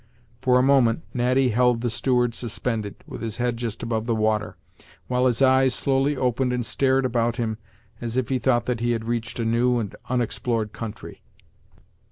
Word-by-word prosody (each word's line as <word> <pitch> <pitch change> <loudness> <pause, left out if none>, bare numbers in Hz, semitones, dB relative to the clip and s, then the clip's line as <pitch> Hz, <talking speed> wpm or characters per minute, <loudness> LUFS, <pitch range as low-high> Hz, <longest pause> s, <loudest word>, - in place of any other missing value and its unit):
For 125 -1 +4
a 125 - +4
moment, 135 0 +3
Natty 125 +1 +2
held 125 0 +2
the 120 - 0
steward 125 -1 +1
suspended, 115 -3 -3
with - - -8
his 110 -2 -4
head 120 -1 0
just 115 -2 -4
above 115 -1 -2
the 115 - +1
water, 110 -1 0 0.5
while 125 0 +2
his 125 +1 +2
eyes 130 -1 +4
slowly 135 +1 +1
opened 125 0 0
and 125 -1 -1
stared 135 +2 +1
about 120 -2 0
him, 110 -3 -2 0.4
as 120 +1 -3
if 130 -3 0
he 130 -1 +1
thought 120 -1 +2
that 125 -2 -1
he 120 +1 +1
had 115 -1 -3
reached 115 0 -3
a 115 - -1
new 120 +2 +2
and 105 -4 -3
unexplored 120 -3 -1
country. 110 -2 -8
120 Hz, 185 wpm, -24 LUFS, 115-125 Hz, 0.5 s, For